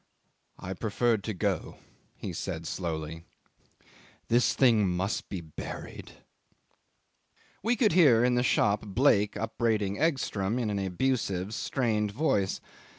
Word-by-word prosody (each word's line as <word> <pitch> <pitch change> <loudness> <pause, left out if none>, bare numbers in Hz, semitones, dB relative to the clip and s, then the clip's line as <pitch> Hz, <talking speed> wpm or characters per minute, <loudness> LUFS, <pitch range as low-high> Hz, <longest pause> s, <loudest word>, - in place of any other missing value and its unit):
"I 95 - -5
preferred 110 +1 0
to 110 - -2
go," - - -2 0.4
he - - -6
said 80 +1 -4
slowly; 80 -2 -4 1.1
"this 115 -1 +3
thing 115 -6 +4
must 95 +4 -2
be 95 -4 -4
buried." 80 -2 -8 1.5
'We 235 +2 +1
could 215 -3 +3
hear 140 -10 +6
in 125 0 +3
the 125 - +2
shop 105 -4 +2
Blake 105 -1 +2
upbraiding 110 -3 -1
Egstrom 125 -9 0
in 115 -4 -1
an 100 - -1
abusive, 100 -1 -1
strained 110 -2 0
voice. 100 -5 0
105 Hz, 120 wpm, -29 LUFS, 95-125 Hz, 1.5 s, hear